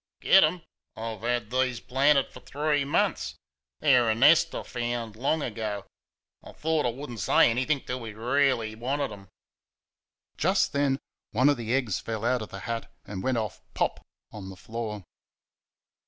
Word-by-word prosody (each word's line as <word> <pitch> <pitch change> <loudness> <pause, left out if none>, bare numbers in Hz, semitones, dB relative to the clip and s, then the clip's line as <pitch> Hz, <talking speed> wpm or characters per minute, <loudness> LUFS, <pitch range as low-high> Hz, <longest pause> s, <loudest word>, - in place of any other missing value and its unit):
"Get 195 - +6
'em! 165 +2 +1 0.3
I've 110 -2 -5
had 120 -1 -1
these 130 -2 +1
planted 135 +2 +2
for - - -11
three 145 0 0
munce 140 - 0 0.5
they're 125 -6 +5
a 110 - +2
nest 155 +8 +5
I - - -3
found 120 -2 -3
long 140 +6 0
ago; 105 -3 -4 0.6
I - - -11
thought 155 -3 0
I - - +2
would 135 +3 -7
n't 115 - -7
say 100 - +5
anythink 130 +4 0
till 125 +1 -3
we 115 -3 -7
really 125 -1 +1
wanted 130 +4 -2
'em." 100 -2 -11 1.1
Just 190 0 +2
then 140 -1 +2 0.4
one 130 +6 +4
of 145 - +2
the 115 +1 -1
eggs 120 -8 0
fell 115 0 -4
out 125 0 +2
of 110 - -6
the 100 - -8
hat 115 -1 -4
and 95 -2 -6
went 130 +1 0
off 110 -4 -3
"pop" - - -1 0.3
on 95 -2 -8
the 95 - -9
floor. 110 -1 -5
120 Hz, 170 wpm, -27 LUFS, 110-140 Hz, 1.1 s, Get